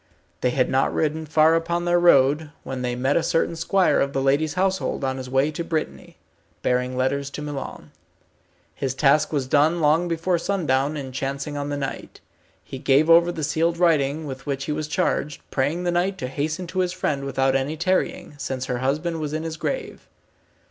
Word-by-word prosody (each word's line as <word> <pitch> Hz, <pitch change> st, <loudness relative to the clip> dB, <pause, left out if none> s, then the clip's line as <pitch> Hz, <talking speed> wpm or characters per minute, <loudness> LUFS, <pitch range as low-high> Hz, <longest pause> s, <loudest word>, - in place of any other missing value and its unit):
They 125 Hz, -, +2 dB
had 130 Hz, 0 st, +1 dB
not 135 Hz, +1 st, +1 dB
ridden 155 Hz, 0 st, -1 dB
far 155 Hz, +1 st, +4 dB
upon 170 Hz, +1 st, 0 dB
their 175 Hz, 0 st, +3 dB
road, 150 Hz, -2 st, +4 dB
when 130 Hz, -1 st, -5 dB
they 125 Hz, -1 st, -2 dB
met 130 Hz, +3 st, +1 dB
a 170 Hz, -, +3 dB
certain 165 Hz, +1 st, 0 dB
squire 185 Hz, +3 st, +2 dB
of 140 Hz, 0 st, 0 dB
the 135 Hz, -, 0 dB
lady's 145 Hz, +4 st, +1 dB
household 190 Hz, -4 st, 0 dB
on 130 Hz, 0 st, -1 dB
his 130 Hz, -1 st, -6 dB
way 135 Hz, +3 st, +2 dB
to 170 Hz, -, -4 dB
Brittany, 160 Hz, -2 st, -4 dB, 0.5 s
bearing 125 Hz, 0 st, 0 dB
letters 140 Hz, +2 st, 0 dB
to 150 Hz, -, -7 dB
Milon. 145 Hz, -2 st, -6 dB, 0.8 s
His 130 Hz, -1 st, -3 dB
task 150 Hz, +2 st, +3 dB
was 140 Hz, -4 st, 0 dB
done 150 Hz, +5 st, +3 dB
long 160 Hz, +3 st, +3 dB
before 170 Hz, +1 st, 0 dB
sundown 150 Hz, -6 st, 0 dB
in 135 Hz, -2 st, -6 dB
chancing 140 Hz, +2 st, -4 dB
on 145 Hz, 0 st, -3 dB
the 145 Hz, -, -2 dB
knight. 140 Hz, -1 st, -6 dB, 0.4 s
He 135 Hz, -, -8 dB
gave 145 Hz, +5 st, +3 dB
over 170 Hz, +1 st, +6 dB
the 160 Hz, -3 st, -5 dB
sealed 165 Hz, +3 st, +1 dB
writing 155 Hz, -3 st, +2 dB
with 135 Hz, 0 st, -8 dB
which 140 Hz, -1 st, -2 dB
he -, -, -3 dB
was 150 Hz, 0 st, -2 dB
charged, 150 Hz, -1 st, -1 dB
praying 145 Hz, +6 st, 0 dB
the 175 Hz, -, +1 dB
knight 180 Hz, +3 st, 0 dB
to 145 Hz, -, -4 dB
hasten 155 Hz, +6 st, -3 dB
to 185 Hz, +2 st, -4 dB
his 180 Hz, -1 st, +1 dB
friend 145 Hz, -6 st, -2 dB
without 135 Hz, -1 st, +1 dB
any 135 Hz, +4 st, -1 dB
tarrying, 185 Hz, -1 st, -1 dB
since 130 Hz, -2 st, -3 dB
her 125 Hz, -1 st, -2 dB
husband 155 Hz, +6 st, -1 dB
was 150 Hz, -1 st, -4 dB
in 155 Hz, +1 st, -2 dB
his 165 Hz, -1 st, -4 dB
grave. 460 Hz, -, -4 dB
150 Hz, 195 wpm, -23 LUFS, 135-165 Hz, 0.8 s, over